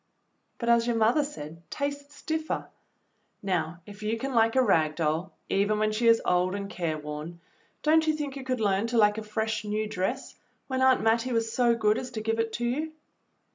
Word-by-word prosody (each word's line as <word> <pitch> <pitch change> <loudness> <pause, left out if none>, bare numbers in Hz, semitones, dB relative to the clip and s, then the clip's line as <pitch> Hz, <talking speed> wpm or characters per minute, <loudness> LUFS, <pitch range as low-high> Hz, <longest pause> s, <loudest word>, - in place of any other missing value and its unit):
"But 235 - -4
as 235 0 +4
your 240 - +1
mother 230 +7 +3
said, 165 - -8
'tastes 285 +1 -5
differ.' 315 0 -2 0.8
Now 175 -3 -1
if 205 0 -12
you 215 +2 -1
can 270 +3 -4
like 225 0 +3
a 260 - +5
rag 160 -8 +2
doll 160 +3 -1 0.2
even 205 +2 +1
when 215 0 +1
she 230 +2 +1
is 230 0 +6
old 180 +1 +2
and 200 0 -4
care 165 -3 -2
worn, 150 +3 -7 0.4
don't 315 +1 +4
you 310 - +3
think 290 -3 -4
you 275 - -6
could 255 -1 -2
learn 200 +1 +2
to 235 0 -1
like 210 -1 +4
a - - -5
fresh 220 0 -2
new 210 +1 -1
dress, 215 +6 -3 0.3
when 260 -1 -2
Aunt 260 -1 +5
JMattie 230 +3 +2
was 225 -1 0
so 240 -2 +3
good 215 -1 +2
as 255 - -6
to 220 - -3
give 225 +1 -1
it 225 0 0
to 240 - -2
you.?" 305 +6 -2
225 Hz, 210 wpm, -28 LUFS, 200-255 Hz, 0.8 s, is